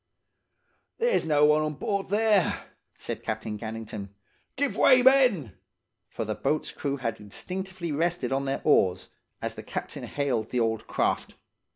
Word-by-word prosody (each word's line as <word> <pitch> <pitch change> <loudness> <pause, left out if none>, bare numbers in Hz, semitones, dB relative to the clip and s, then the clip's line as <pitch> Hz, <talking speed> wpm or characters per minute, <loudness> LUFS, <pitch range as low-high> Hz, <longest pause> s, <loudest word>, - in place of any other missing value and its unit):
"'There's 480 - +1
no 150 -1 +5
one 150 +1 +4
on 155 -1 -2
board 200 +6 -2
there!' 210 -2 +2 0.3
said - - -5
Captain 110 0 -3
Gannington. 110 -2 -6 0.5
'Give 280 0 0
way, 255 -2 +6
men!' 250 - +4 0.6
For - - -4
the - - -2
boat's 155 - -1
crew 140 -1 -3
had 115 -4 -3
instinctively 180 - -5
rested 160 -3 0
on 135 +1 0
their 135 0 -2
oars, 95 -11 +3 0.3
as - - -2
the - - -8
captain - - -5
hailed 130 -6 -1
the 125 - 0
old 110 -1 0
craft. - - -1
150 Hz, 150 wpm, -27 LUFS, -, 0.6 s, way